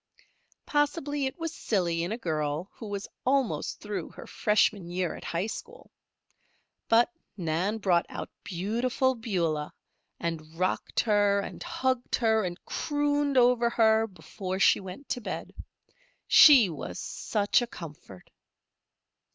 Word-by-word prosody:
Possibly 290 -1 0
it 265 - -6
was 330 -1 -4
silly 175 - 0
in 175 +4 -2
a 225 - -2
girl 155 -3 -2
who 220 - -9
was 200 -1 -4 0.2
almost 265 -2 0
through 205 -5 -4
her - - -11
freshman 210 -4 +1
year 180 0 -1
at - - -10
high 170 +3 -2
school, 470 - -8 1.0
but 235 +8 +5 0.3
Nan 180 +5 -1
brought 185 -5 +2
out - - -6
Beautiful 235 +8 0
Beulah 170 -11 -2 0.5
and 160 -1 -4
rocked 185 +1 0
her, 205 -2 +3
and - - -8
hugged 260 -8 -1
her, 220 -2 +2
and 175 -1 -5
crooned 290 -2 0
over 245 -1 +4
her 220 -1 +3
before 185 0 -6
she 195 - +5
went 190 +8 -9
to 245 - -2
bed. - - -5 0.7
She 270 -8 +8
was 160 -5 -6
such 205 +2 0
a 240 - -2
comfort! 150 - -11
210 Hz, 135 wpm, -28 LUFS, 175-250 Hz, 1.0 s, She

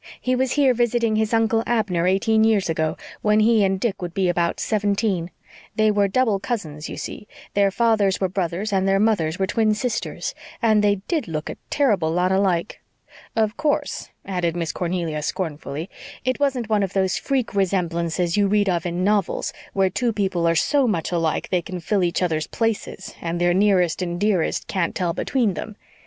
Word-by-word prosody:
He 255 0 0
was 260 0 0
here 275 -3 +4
visiting 235 -2 +1
his 220 0 +1
Uncle 225 0 +2
Abner 195 -7 +1
eighteen 220 +4 +3
years 210 -6 +2
ago, 160 -1 -1 0.2
when 210 0 +3
he 220 -1 +4
and 190 -1 +1
Dick 210 -2 -2
would 175 -1 -5
be 190 -2 +2
about 170 -1 0
seventeen. 205 -4 0 0.5
They 215 0 +3
were 205 -1 +2
double 215 -1 +1
cousins, 160 -10 -4
you - - -6
see. 210 - -7 0.3
Their 200 -1 +3
fathers 210 -2 +2
were 190 - +1
brothers 185 +3 -2
and 190 0 +2
their 195 0 +3
mothers 195 -7 +1
were 195 - +1
twin 215 +2 +1
sisters, 220 0 -3 0.3
and 215 -3 +3
they 205 -2 +2
did 315 - -1
look 155 -2 -4
a - - -9
terrible 210 - +2
lot 180 +3 +1
alike. 190 -2 0 0.5
Of 220 -1 +1
course," 295 -2 -1 0.2
added 175 -3 -1
Miss 165 -3 -2
Cornelia 170 -3 -2
scornfully, 155 -1 -4 0.4
"it 255 +1 0
wasn't 265 -5 0
one 210 -1 +2
of 195 -2 -2
those 190 -1 +1
freak 265 -5 -1
resemblances 175 -3 0
you 205 -1 +3
read 205 0 +2
of 175 -1 0
in 175 +1 -2
novels 205 -1 0 0.2
where 190 -1 +2
two 240 +5 0
people 190 -5 0
are 165 - +3
so 280 - +2
much 170 -7 -1
alike 165 -3 0
that - - -12
they 180 -2 +2
can 180 +2 -6
fill 190 +3 0
each 175 +1 0
other's 160 -3 0
places 225 -4 -3
and 170 0 -2
their 175 0 +3
nearest 185 -3 +2
and 175 -1 -3
dearest 200 -5 +1
can't 185 -4 -1
tell 175 -2 0
between 235 -3 0
them. 215 +4 -6
195 Hz, 190 wpm, -22 LUFS, 175-220 Hz, 0.5 s, here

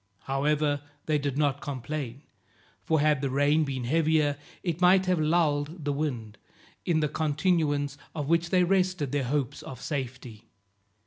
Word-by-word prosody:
However, 145 +1 +1 0.2
they 155 -1 +1
did 140 -1 -2
not 145 -2 +1
complain, 140 -1 -5 0.6
for 160 -1 +2
had 150 -2 +3
the 140 - 0
rain 145 +4 +3
been 135 -3 -3
heavier, 155 +1 +2 0.3
it 175 -1 -2
might 185 +1 +5
have 180 -2 +1
lulled 155 -1 +1
the 145 - 0
wind, 120 -8 -3 0.5
in 160 -3 +2
the 150 - +2
continuance 150 -2 0 0.2
of 145 -3 -3
which 170 +1 +2
they 180 -1 +4
rested 185 -6 +1
their 145 -2 0
hopes 135 -1 -1
of 130 - -9
safety. 125 -6 -5
150 Hz, 150 wpm, -28 LUFS, 140-160 Hz, 0.6 s, might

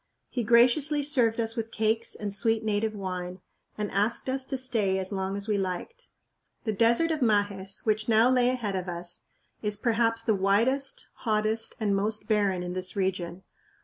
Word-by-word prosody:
He 245 - -2
graciously 255 +6 +4
served 245 -6 +2
us 225 0 -1
with 225 -2 -3
cakes 225 +1 0
and 205 -1 -4
sweet 225 +2 +1
native 215 0 0
wine, 185 -2 -5 0.4
and 210 -1 -3
asked 210 +6 0
us 265 0 -1
to 270 - -3
stay 225 -7 +1
as 190 +1 -2
long 190 0 -2
as 200 +1 -5
we 210 -2 +1
liked. 195 - -5 0.5
The 220 - -1
desert 235 +10 +3
of 315 - -1
Majes, 205 -4 0
which 215 0 0
now 225 +1 +5
lay 250 -1 +4
ahead 235 -6 -1
of 185 -1 -3
us, 175 0 -5 0.4
is 210 -1 0
perhaps 230 0 +1
the 220 - +2
widest, 225 +8 +1
hottest, 220 0 -1
and 205 -3 +1
most 210 +1 -2
barren 200 -4 +1
in 180 0 -4
this 185 +1 -2
region. 185 -2 -2
215 Hz, 180 wpm, -27 LUFS, 195-235 Hz, 0.5 s, now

